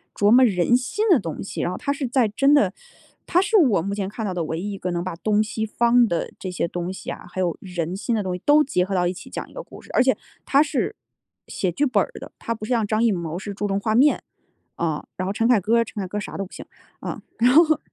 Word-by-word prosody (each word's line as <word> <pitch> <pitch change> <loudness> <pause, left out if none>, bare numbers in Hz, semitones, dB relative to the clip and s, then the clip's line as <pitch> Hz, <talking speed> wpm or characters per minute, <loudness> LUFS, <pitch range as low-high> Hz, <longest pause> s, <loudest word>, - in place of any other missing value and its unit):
琢 205 - +3
磨 255 +2 +7
人 200 +2 +3
心 420 - -2
的 340 -8 +6
东 165 -5 -5
西。 200 - -5
然 175 - -1
后 185 - -4
他 280 - -2
是 280 -2 -2
在 245 -1 +2
真 275 +7 +3
的 210 -11 +4 0.6
他 360 - +3
是 410 +3 +3
我 250 - +4
目 200 +4 -3
前 200 -2 -2
看 215 +3 -6
到 195 - -2
的 175 -2 -2
唯 160 +1 -3
一 205 +2 -4
一 200 - -5
个 180 -1 -3
能 175 0 -2
把 185 -2 -4
东 210 +3 +2
西 220 +1 -3
方 235 +2 +3
的 170 -4 -2
这 185 - -5
些 180 -1 -1
东 175 +1 -3
西 - - -6
啊， - - -9
还 185 - -3
有 175 -3 -1
人 180 -2 -4
心 230 +3 -1
的 215 - 0
东 185 -1 -2
西， 180 - -8
都 300 +1 +6
结 180 -10 0
合 195 +1 -3
到 175 -1 +2
一 180 - -1
起 - - -11
讲 - - -6
一 - - -18
个 - - -6
故 - - -13
事。 - - -18
而 - - +4
且 260 0 +3 0.3
他 280 +2 +4
是 305 - -2 0.5
写 185 - -2
剧 290 - +1
本 240 -7 +2
儿 - - -7
的， - - -10
他 230 - -3
不 215 - -11
像 230 -1 +1
张 215 +2 +1
艺 230 - +4
谋 170 -3 -3
是 200 +2 -6
注 205 +1 -2
重 195 0 0
画 215 +2 -1
面。 280 +5 +4 0.6
嗯， 160 -3 -1 0.2
然 185 - -2
后 - - 0
陈 225 +3 +1
凯 240 -5 +4
歌 225 +5 +2
儿 230 - +4
陈 210 - -6
凯 190 - -4
歌 205 - -5
儿 - - -2
啥 - - -7
都 195 - -2
不 - - -36
行。 - - -9 0.4
嗯， - - -4 0.2
然 245 +2 +4
后， 315 0 +5
210 Hz, 310 characters per minute, -23 LUFS, 185-245 Hz, 0.6 s, 磨